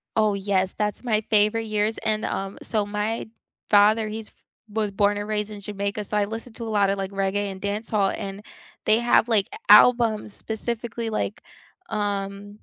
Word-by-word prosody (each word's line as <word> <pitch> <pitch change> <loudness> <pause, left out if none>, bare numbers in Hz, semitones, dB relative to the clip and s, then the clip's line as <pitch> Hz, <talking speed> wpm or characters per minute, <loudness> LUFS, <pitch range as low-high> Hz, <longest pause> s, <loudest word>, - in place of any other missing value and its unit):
Oh, 215 -2 +3
yes, 190 -1 0
that's 210 +1 -2
my 220 -3 +1
favorite 215 +1 +3
years 215 0 0
and, 215 0 -1
um, 195 0 -3
so 210 -2 -1
my 210 +2 -3 0.4
father, 215 +1 +5
he's 220 0 -6
f - - -31 0.4
was 210 -1 -1
born 205 +1 +2
and 205 0 -4
raised 210 0 -1
in 205 - -7
Jamaica, 200 +1 -3
so 210 - -3
I 210 - +3
listened 225 +2 -7
to 235 - -6
a 225 - -4
lot 205 -2 +3
of 195 - 0
like 195 0 -3
reggae 195 +1 -1
and 190 0 -10
dancehall, 205 -1 0
and 200 0 -6 0.4
they 215 +1 +5
have 240 -1 +4
like 215 -4 +2
a 425 - -8
albums 225 -4 +6
specifically 230 0 -4
like, 215 -1 -3 0.5
um, 205 0 -3
210 Hz, 185 wpm, -24 LUFS, 200-220 Hz, 0.5 s, albums